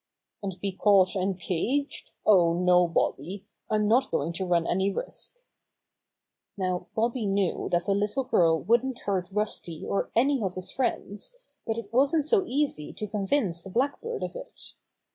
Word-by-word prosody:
"And 190 -3 -5
be 195 +1 -2
caught 190 -1 +4
and 190 0 -1
caged? 245 - -1 0.2
Oh, 175 -5 +5
no, 180 0 +4
Bobby, 170 +3 -1 0.2
I'm 210 -1 +2
not 250 +5 +3
going 165 +4 -1
to 185 +2 -3
run 170 -2 +2
any 190 +3 +1
risk!" - - -5 1.1
Now 185 -2 -2
Bobby 230 0 0
knew 195 -2 0
that 175 0 +1
the 200 - +2
little 210 +7 0
girl 165 -9 +3
wouldn't 240 +6 +1
hurt 185 -3 -1
Rusty 195 -5 -2
or 200 - -1
any 265 +2 +3
of 190 -3 -2
his 185 -1 -5
friends, 245 - -2 0.3
but 225 0 -1
it 225 -2 -7
wasn't 280 +4 +3
so 390 +5 +3
easy 275 - -1
to 215 - -4
convince 200 -3 0
the 195 - -8
Blackbird 285 - -1
of - - -5
it. - - -9
200 Hz, 160 wpm, -27 LUFS, 180-245 Hz, 1.1 s, Oh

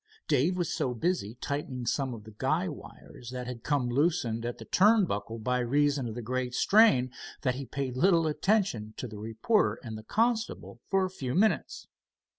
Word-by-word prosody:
Dave 155 +6 +2
was 175 -3 -1
so 125 -2 -1
busy 120 - -1
tightening 130 -1 -4
some 130 +1 -1
of 105 - -11
the 110 0 -13
guy 155 +7 +1
wires 135 -5 -10
that 125 0 -5
had 125 -2 -6
come 140 -2 0
loosened 120 -4 +1
at 120 - -4
the - - -10
turn 210 +1 +5
buckle, 105 - -4
by 125 +3 0
reason 140 +1 +1
of 110 - -6
the 120 - -5
great 125 +1 -2
strain, 150 - +5 0.3
that 130 - +2
he 135 +1 -6
paid 130 0 -3
little 170 +3 +4
attention 155 - 0
to 125 - -4
the 105 -2 -9
reporter 115 - +1
and 110 -3 -6
the - - -12
constable 225 - -1
for 195 -1 +3
a - - -3
few 130 -8 -4
minutes. 215 +4 +1
130 Hz, 190 wpm, -29 LUFS, 120-175 Hz, 0.3 s, turn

